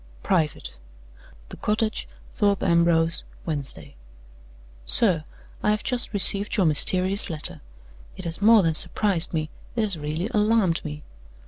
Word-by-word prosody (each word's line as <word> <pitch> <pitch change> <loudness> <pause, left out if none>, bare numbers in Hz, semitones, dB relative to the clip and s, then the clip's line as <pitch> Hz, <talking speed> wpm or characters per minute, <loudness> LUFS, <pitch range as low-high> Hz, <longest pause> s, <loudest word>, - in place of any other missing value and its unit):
["Private."] 155 - -3 0.7
"The - - -11
Cottage, 215 +1 -3 0.3
Thorpe 200 -2 -1
Ambrose, 170 -1 +1 0.2
Wednesday. 135 - -7 0.9
"SIR 175 -9 +7 0.4
I 210 - -1
have 210 0 -1
just 250 -2 -1
received 205 +1 +4
your 195 - +1
mysterious 185 +6 +2
letter. 155 -2 -4 0.6
It - - -9
has 170 +3 -6
more 220 -1 +4
than 165 -1 0
surprised, 180 +1 0
it 155 -1 -3 0.3
has 210 -7 -2
really 155 +5 -5
alarmed 210 -5 0
me. 150 -1 -9
180 Hz, 125 wpm, -22 LUFS, 160-210 Hz, 0.9 s, SIR